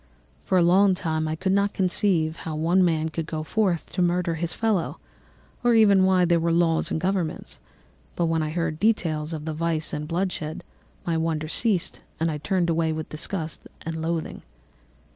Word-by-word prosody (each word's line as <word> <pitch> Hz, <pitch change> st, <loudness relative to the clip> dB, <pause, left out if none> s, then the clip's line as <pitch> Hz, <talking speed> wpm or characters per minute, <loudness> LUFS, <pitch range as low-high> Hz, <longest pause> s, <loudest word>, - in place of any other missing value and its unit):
For 185 Hz, -, +1 dB
a 175 Hz, -, +5 dB
long 190 Hz, +2 st, +5 dB
time 160 Hz, -3 st, -2 dB
I 155 Hz, -, -2 dB
could 185 Hz, +4 st, -1 dB
not 200 Hz, +1 st, +1 dB
conceive 180 Hz, -4 st, +1 dB
how 160 Hz, -, -5 dB
one 170 Hz, +4 st, +3 dB
man 160 Hz, -2 st, +1 dB
could 160 Hz, 0 st, -4 dB
go 155 Hz, -1 st, -3 dB
forth 185 Hz, -1 st, 0 dB
to 185 Hz, -, -1 dB
murder 175 Hz, -1 st, +1 dB
his 165 Hz, +1 st, -2 dB
fellow, 220 Hz, -7 st, 0 dB, 0.7 s
or 240 Hz, -1 st, +4 dB
even 200 Hz, -4 st, +6 dB
why 185 Hz, -1 st, +4 dB
there 170 Hz, -1 st, +3 dB
were 165 Hz, +1 st, +1 dB
laws 165 Hz, -1 st, +2 dB
and -, -, -1 dB
governments; 180 Hz, -, -2 dB, 0.6 s
but 170 Hz, -, +1 dB
when 165 Hz, -1 st, +1 dB
I 155 Hz, -, -1 dB
heard 165 Hz, -1 st, -2 dB
details 165 Hz, -7 st, +1 dB
of 155 Hz, -2 st, -5 dB
vice 160 Hz, 0 st, -1 dB
and 150 Hz, 0 st, -3 dB
bloodshed, 170 Hz, -2 st, -3 dB, 0.4 s
my 165 Hz, -1 st, 0 dB
wonder 160 Hz, -1 st, -1 dB
ceased 195 Hz, +1 st, -1 dB, 0.2 s
and 165 Hz, 0 st, +1 dB
I 150 Hz, -, -4 dB
turned 180 Hz, +3 st, 0 dB
away 165 Hz, -1 st, +1 dB
with 155 Hz, 0 st, -4 dB
disgust 160 Hz, +1 st, -5 dB, 0.2 s
and 165 Hz, 0 st, -4 dB
loathing. 165 Hz, 0 st, -3 dB
165 Hz, 180 wpm, -25 LUFS, 160-185 Hz, 0.7 s, even